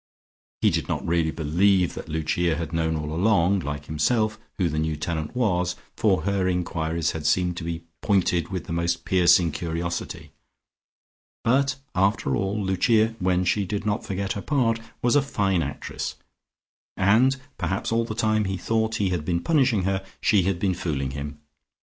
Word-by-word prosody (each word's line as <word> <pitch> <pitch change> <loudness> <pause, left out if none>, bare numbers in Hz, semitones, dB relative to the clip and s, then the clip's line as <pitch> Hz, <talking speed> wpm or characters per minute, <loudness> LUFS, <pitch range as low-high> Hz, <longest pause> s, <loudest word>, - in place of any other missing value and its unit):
He - - +4
did - - -1
not - - -2
really 85 -1 +1
believe 90 +4 +2
that - - -8
Lucia 80 +2 0
had 85 0 -5
known 80 -1 0
all 75 0 -3
along, 95 +1 +3
like 75 -3 -5
himself, 110 +9 0 0.2
who 90 - +2
the 75 -2 -1
new 80 0 -1
tenant 80 +4 -3
was, 90 -7 +1 0.2
for 100 -4 +2
her 100 -1 +1
enquiries 85 -3 -1
had 75 -2 -3
seemed 90 +1 +2
to 90 - -5
be 85 0 -4 0.2
pointed 95 -4 +2
with 95 -2 -3
the - - -6
most 85 0 -1
piercing 90 -2 +4
curiosity, 85 +2 -4 1.1
but, 130 +3 +2 0.2
after 95 -7 +1
all, 100 - -1
Lucia 110 +4 +3
(when 90 0 +1
she 100 +3 +2
did 100 +2 -3
not 105 0 0
forget 100 0 -2
her 100 - -5
part) 120 -5 +1 0.2
was 120 +2 +3
a 145 - +6
fine 100 -9 0
actress, 70 -2 -4 0.8
and 115 +8 +4 0.2
perhaps 95 +4 -2
all 115 0 +2
the 115 -1 -5
time 110 -2 +1
he 95 0 -2
thought 110 +4 0
he 100 -3 +1
had 90 -4 -1
been 85 +1 0
punishing 130 - +2
her, 95 +1 0 0.2
she 105 -3 +3
had 95 0 0
been 95 +1 +1
fooling 70 -6 -2
him. 70 +2 -6
90 Hz, 175 wpm, -25 LUFS, 85-105 Hz, 1.1 s, a